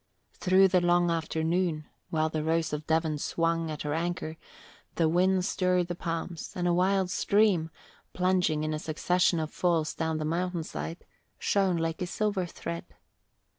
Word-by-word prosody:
Through 190 +1 +4
the 180 -1 +3
long 175 0 +3
afternoon, 160 0 -1 0.2
while 155 -1 +1
the 155 -1 -2
Rose 160 0 0
of 150 0 -4
Devon 160 -2 +1
swung 165 +1 0
at 155 -1 -5
her 145 0 -2
anchor, 165 -1 -2 0.6
the 165 - +3
wind 180 +2 +2
stirred 180 -2 +1
the - - -1
palms 165 -1 -4
and 175 -1 -1
a 175 - +3
wild 185 +1 +2
stream, 200 -5 +2 0.4
plunging 180 -4 +1
in 155 0 -1
a 155 - -2
succession 170 +3 +1
of 155 -1 -3
falls 165 -3 +1
down 160 -1 -2
a 155 - -2
mountainside, 170 0 -3 0.3
shone 195 -3 +1
like 165 +2 -2
a 180 - -1
silver 200 -2 -1
thread. 170 0 -6
170 Hz, 160 wpm, -28 LUFS, 160-180 Hz, 0.6 s, Through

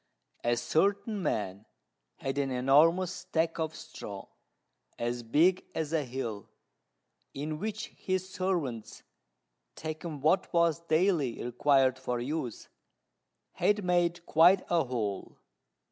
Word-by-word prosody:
A 120 0 +2
certain 200 - +1
man 105 - -2 0.5
had 135 +1 -3
an 140 -1 0
enormous 150 +8 +4
stack 165 0 -1
of 160 -1 -2
straw, 100 -2 -9 0.7
as 120 +1 -2
big 160 +11 +3
as 160 -1 -2
a 160 -2 +2
hill, 120 -6 -5 0.9
in 150 +2 -4
which 215 +1 -4
his 185 0 -3
servants, 170 - -3 0.7
taking 155 -1 -5
what 160 +6 +2
was 170 -2 +3
daily 165 -5 +1
required 130 +1 +3
for 125 -2 -2
use, 125 -2 -4 0.8
had 205 0 +1
made 175 -1 +1
quite 175 +4 +5
a 170 -1 +4
hole. 110 -6 -3
155 Hz, 115 wpm, -30 LUFS, 125-175 Hz, 0.9 s, quite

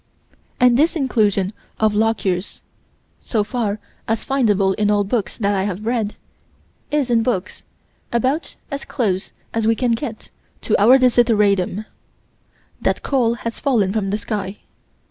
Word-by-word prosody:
And 245 -1 +5
this 315 +5 +3
inclusion 210 - +1 0.3
of 215 -1 +3
Lockyer's 210 -4 0 0.6
so 220 -4 -1
far 215 -1 -2 0.3
as 225 0 -1
findable 210 -8 +2
in 210 +1 0
all 205 -1 +3
books 205 0 -2
that 205 -2 +1
I 195 - +1
have 205 +1 -4
read 225 -3 -1 0.7
is, 290 -4 0
in 230 -1 +4
books, 225 -6 -2 0.5
about 260 +7 0 0.2
as 280 0 -4
close 195 -6 -2 0.2
as 225 -1 0
we 225 - +4
can 245 +1 0
get 230 -1 -4 0.3
to - - +1
our 245 +6 +8
desideratum 215 -6 +3 1.0
that - - 0
coal 240 -4 +1
has 230 - -3
fallen 220 -9 +1
from 210 -3 -1
the 205 - 0
sky. 210 -2 -4
220 Hz, 145 wpm, -20 LUFS, 205-245 Hz, 1.0 s, our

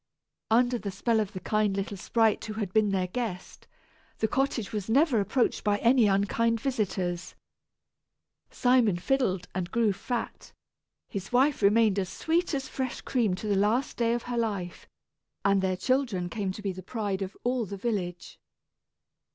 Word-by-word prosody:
Under 245 +2 +3
the 205 - -4
spell 220 +4 0
of 210 -1 -2
the 185 - -5
kind 210 0 0
little 200 +1 -3
sprite 220 +3 +1
who 215 - -5
had 205 -4 -4
been 215 -1 +3
their 190 -2 +1
guest, 185 -2 -5 0.5
the 220 - +1
cottage 265 -4 -1
was 210 -1 -4
never 270 0 +4
approached 215 +5 0
by 205 -1 +2
any 235 0 +4
unkind 225 +4 +1
visitors. 190 -8 -2 1.1
Simon 245 -7 +3
fiddled 190 -4 0
and 175 -1 -3
grew 230 -3 +2
fat, 235 +4 -5 0.5
his 195 -2 -6
wife 265 +2 +3
remained 210 0 +4
as 185 -2 -2
sweet 335 0 0
as 270 -1 -3
fresh 260 -2 -4
cream 225 -8 0
to 195 - -8
the 205 - +2
last 215 +7 +1
day 235 0 +1
of 240 - -4
her 245 -1 -2
life, 200 -6 -3 0.6
and 200 -1 +4
their 185 -1 0
children 220 -5 0
came 200 -2 -2
to 205 +2 -9
be 195 - -1
the 185 0 -8
pride 200 -1 -3
of 195 0 -5
all 245 -1 0
the 200 - -6
village. 185 -5 -4
215 Hz, 165 wpm, -28 LUFS, 195-240 Hz, 1.1 s, never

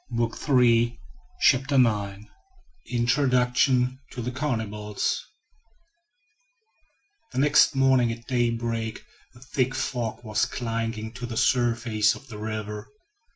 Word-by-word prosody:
CHAPTER 120 - +1
IX 105 -4 +1 0.6
INTRODUCTION 125 +1 +2
TO 125 - -6
THE 125 - -3
CANNIBALS 110 -6 -2 2.1
THE - - -6
next 145 +1 +4
morning 130 -3 +3
at 115 +1 -8
daybreak 115 -2 -1 0.3
a - - -15
thick 130 0 -1
fog 120 -2 -3
was 110 -2 0
clinging 115 -2 -3
to 120 0 -6
the 115 -2 -5
surface 115 -4 +2
of 135 - -14
the 105 -2 -8
river. 105 0 -5
120 Hz, 100 wpm, -25 LUFS, 110-125 Hz, 2.1 s, next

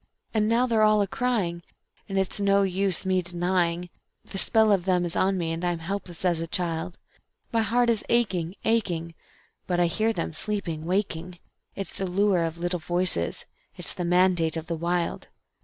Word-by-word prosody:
And 215 -1 +2
now 235 +2 +3
they're 230 -3 +2
all 215 -1 +5
a - - -2
crying, 195 -7 -1 0.5
and 195 - -2
it's 190 +1 -1
no 200 0 +4
use 190 0 0
me 185 -1 +2
denying; 175 0 -1 0.3
The 195 - -4
spell 220 +1 +4
of 190 -3 +2
them 180 -2 +2
is 170 - -2
on 190 0 +2
me 165 -2 -1
and 165 +1 -4
I'm 175 -1 0
helpless 175 +1 -5
as 175 -2 +2
a 165 - -3
child; 170 +1 -2 0.5
My 230 - +2
heart 240 +3 +2
is 230 -3 +1
aching, 190 -7 +1
aching, 175 -7 0 0.5
but 175 -1 0
I 175 - +5
hear 215 +7 +1
them, 170 -6 -3
sleeping, 170 -5 -2
waking; 180 -1 -2 0.4
It's 195 - -5
the 190 - -2
Lure 185 -1 +2
of 165 0 -4
Little 175 +1 -2
Voices, 175 - 0 0.3
it's - - -2
the 180 - -4
mandate 175 -2 +3
of 160 - -4
the 165 0 -3
Wild. 170 +1 -1
180 Hz, 185 wpm, -26 LUFS, 170-200 Hz, 0.5 s, all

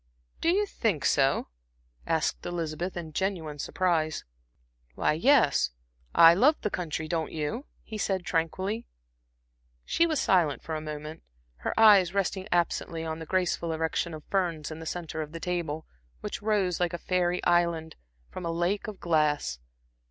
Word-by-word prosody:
"Do 330 - +2
you 400 +4 +3
think 215 - -1
so?" 135 - +2 0.6
asked 160 -3 0
Elizabeth, 170 +1 -3
in 160 -3 -6
genuine 165 -5 -2
surprise. 160 -2 0 0.7
"Why, - - +2
yes, 165 - +4 0.5
I 165 0 +9
love 270 - +4
the 210 - -1
country; 160 -3 -3
don't 160 -1 -2
you," 160 - -3 0.2
he 215 -1 -7
said 190 -3 -1
tranquilly. 185 +7 -1 1.0
She 335 - +2
was 310 -4 0
silent 165 -7 +2
for 160 - -5
a 155 - -2
moment, 155 +1 -7 0.4
her 65 - -3
eyes 200 -4 +7
resting 195 0 -1
absently 170 -1 0
on 160 0 -4
the 160 - -8
graceful 180 -2 0
erection 160 +1 -1
of 155 - -10
ferns 170 -6 -1
in 155 - -7
the 160 - -7
centre 160 -2 -4
of 155 0 -7
the 165 - -5
table, 165 -3 -3 0.4
which - - -5
rose, 205 -5 +1
like 175 -1 0
a - - -2
fairy 180 0 0
island, 170 -2 +1 0.4
from 185 - -7
a 170 - -2
lake 175 +6 -1
of 210 -3 -7
glass. 150 - +1
170 Hz, 160 wpm, -28 LUFS, 160-190 Hz, 1.0 s, I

